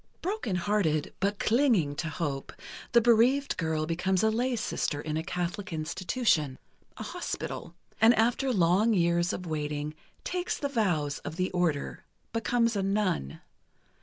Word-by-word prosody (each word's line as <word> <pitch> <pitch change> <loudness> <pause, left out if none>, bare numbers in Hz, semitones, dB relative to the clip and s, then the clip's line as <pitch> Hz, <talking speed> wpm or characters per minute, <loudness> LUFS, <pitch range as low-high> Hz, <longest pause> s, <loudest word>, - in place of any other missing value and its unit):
Broken 370 - -2
hearted, 180 -5 0
but 200 +1 0
clinging 220 - +2
to 165 - -2
hope, 145 -4 -3 0.4
the 235 - +6
bereaved 240 +5 +4
girl 160 -2 0
becomes 185 +4 0
a 220 - +4
lay 245 +3 0
sister 185 -8 -2
in 155 +1 -3
a 160 - 0
Catholic 180 +4 -3
institution—a 160 - -2
hospital—and 225 +7 -1
after 240 +4 +2
long 200 +3 +3
years 170 -1 +2
of 180 - -5
waiting, 150 -1 -3 0.3
takes 360 0 -2
the 285 - -2
vows 175 - 0
of 160 - -7
the 185 +1 -1
Order, 170 -5 -1 0.3
becomes 230 0 +1
a 200 - +1
nun. 195 - -1
185 Hz, 135 wpm, -29 LUFS, 160-230 Hz, 0.4 s, the